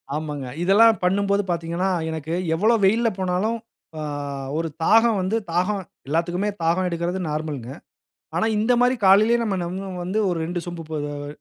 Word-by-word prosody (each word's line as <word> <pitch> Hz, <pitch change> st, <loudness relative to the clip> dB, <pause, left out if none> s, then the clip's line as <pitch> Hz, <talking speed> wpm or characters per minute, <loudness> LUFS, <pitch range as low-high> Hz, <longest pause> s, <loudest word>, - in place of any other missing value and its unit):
ஆமாங்க. 150 Hz, -3 st, -4 dB, 0.2 s
இதெல்லாம் 220 Hz, +5 st, +5 dB
பண்ணும்போது 200 Hz, +2 st, +2 dB
பாத்தீங்கனா, 170 Hz, +2 st, -1 dB, 0.2 s
எனக்கு 160 Hz, 0 st, -4 dB, 0.2 s
எவ்வளவு 220 Hz, +5 st, +3 dB
வெயில்ல 230 Hz, +4 st, +3 dB
போனாலும், 190 Hz, +5 st, 0 dB, 0.4 s
அ -, -, -4 dB, 0.6 s
ஒரு 165 Hz, 0 st, -1 dB
தாகம் 225 Hz, +4 st, +5 dB
வந்து 190 Hz, +5 st, 0 dB
தாகம், 185 Hz, +4 st, 0 dB, 0.3 s
எல்லாத்துக்குமே 175 Hz, +6 st, 0 dB
தாகம் 175 Hz, +3 st, +2 dB
எடுக்கறது 170 Hz, +2 st, -2 dB
நார்மல்ங்க. 150 Hz, -5 st, -4 dB, 0.6 s
ஆனா, 175 Hz, -, +2 dB
இந்த 220 Hz, +4 st, +2 dB
மாரி 250 Hz, +1 st, +4 dB
காலையிலேயே 215 Hz, +5 st, +6 dB
நம்ம 205 Hz, -4 st, -1 dB
நம்ம 190 Hz, +3 st, -5 dB
வந்து 190 Hz, +5 st, -1 dB
ஒரு 175 Hz, -, -1 dB
2 175 Hz, +1 st, -3 dB
சொம்பு, 175 Hz, -1 st, -6 dB
போதவ 145 Hz, -1 st, -4 dB
180 Hz, 145 wpm, -23 LUFS, 165-210 Hz, 0.6 s, காலையிலேயே